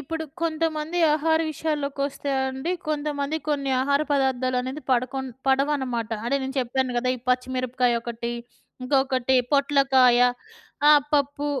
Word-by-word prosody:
ఇప్పుడు 320 +3 -5 0.2
కొంతమంది 320 0 -1 0.2
ఆహార 320 +1 +2
విషయాల్లోకొస్తే 285 -2 -3 0.2
అండి, 265 +7 -3 0.2
కొంతమంది 295 0 -2
కొన్ని 280 -2 -1
ఆహార 280 +1 +2
పదార్థాలనేది 260 +1 0
పడకుం 260 +2 -1 0.2
పడవనమాట. 265 -4 0
అంటే 275 +4 +1
నేను 265 +1 -4
చెప్పాను 250 0 -1
కదా! 255 +1 0
ఈ - - -12
పచ్చిమిరపకాయొకటి, 245 -2 -1 0.5
ఇంకొకటి 265 -1 +1 0.2
పొట్లకాయ, 270 -3 +4 0.7
ఆ! - - +9 0.2
పప్పు 285 0 0
270 Hz, 110 wpm, -24 LUFS, 255-290 Hz, 0.7 s, ఆ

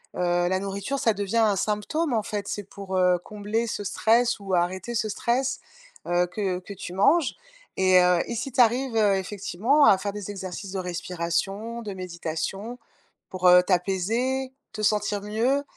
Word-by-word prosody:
heu, 175 0 +1
la 185 +1 +1
nourriture, 200 +8 -3
ça 225 - +2
devient 205 +2 -2
un 215 -3 +4
symptôme, 215 - -1
en 220 -2 +1
fait. 205 -1 -4
C'est 205 - -4
pour, 195 -1 -6
heu, 180 -1 +4
combler 210 +2 -2
ce 205 - -3
stress 225 +4 +2
ou 195 -2 -5
arrêter 185 +6 0
ce 215 -1 0
stress, 250 +5 0 0.5
heu, 175 0 +2
que 185 -1 -2
que 185 +2 -9
tu 180 -2 -8
manges. 280 - +3 0.4
Et 185 -1 +5
heu, 180 -1 +4
et 235 - -4
si 255 +4 -4
tu 250 - +4
arrives, 245 +1 +2
heu, 210 -3 +4
effectivement 205 +8 +1
à 195 - +6
faire 200 +1 -4
des 205 -1 -6
exercices 190 -1 -6
de 195 - -3
respiration 185 +6 -3
de 205 -3 -6
méditation, 185 +5 -5 0.5
pour, 185 -1 0
heu, 180 0 +8
t'apaiser, 220 +9 0 0.2
te 215 - -5
sentir 210 -1 +1
mieux 235 +7 0
200 Hz, 175 wpm, -25 LUFS, 185-230 Hz, 0.5 s, heu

